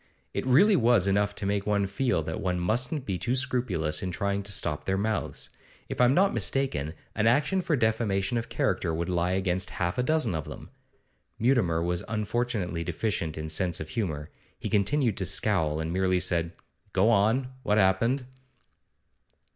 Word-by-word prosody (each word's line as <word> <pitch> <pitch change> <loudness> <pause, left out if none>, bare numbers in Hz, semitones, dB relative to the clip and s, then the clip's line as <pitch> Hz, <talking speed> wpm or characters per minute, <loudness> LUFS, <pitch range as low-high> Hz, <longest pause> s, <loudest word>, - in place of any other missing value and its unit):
It - - -3
really 195 +12 +6
was 115 - +3
enough 100 +1 +1
to - - -4
make 100 0 -1
one 100 -1 +2
feel 100 -3 0
that 80 +1 -4
one 90 -1 -1
mustn't 125 - 0
be 95 -6 -2
too 120 +2 0
scrupulous 110 -13 -1
in 95 - -3
trying 100 +2 -1
to 100 +1 -4
stop 75 -5 -2
their 95 0 0
mouths. 110 +2 -2 0.4
If - - -2
I'm 125 +2 +5
not 195 +2 +4
mistaken, 85 - -1 0.2
an 110 +1 +1
action 150 +10 +2
for 165 -3 +1
defamation 110 -2 0
of 115 - -7
character 80 - 0
would 85 +2 -2
lie 90 0 +1
against 95 -1 0
half 90 +5 -1
a - - +4
dozen 155 - +2
of 80 -3 -3
them.' - - -10 0.7
Mutimer 105 -10 +2
was 90 0 -1
unfortunately 105 -5 -2
deficient 85 -2 -2
in 80 0 -4
sense 85 +2 0
of 80 - -6
humour. 80 -7 -3 0.3
He - - -5
continued 110 +3 +1
to 95 - -1
scowl, 90 -5 +1
and 80 +1 -3
merely 95 0 +2
said: 85 -1 -1 0.4
'Go 100 +5 +4
on; 115 +5 +2
what 105 -4 +1
happened? 115 +7 +2
100 Hz, 175 wpm, -27 LUFS, 90-120 Hz, 0.7 s, really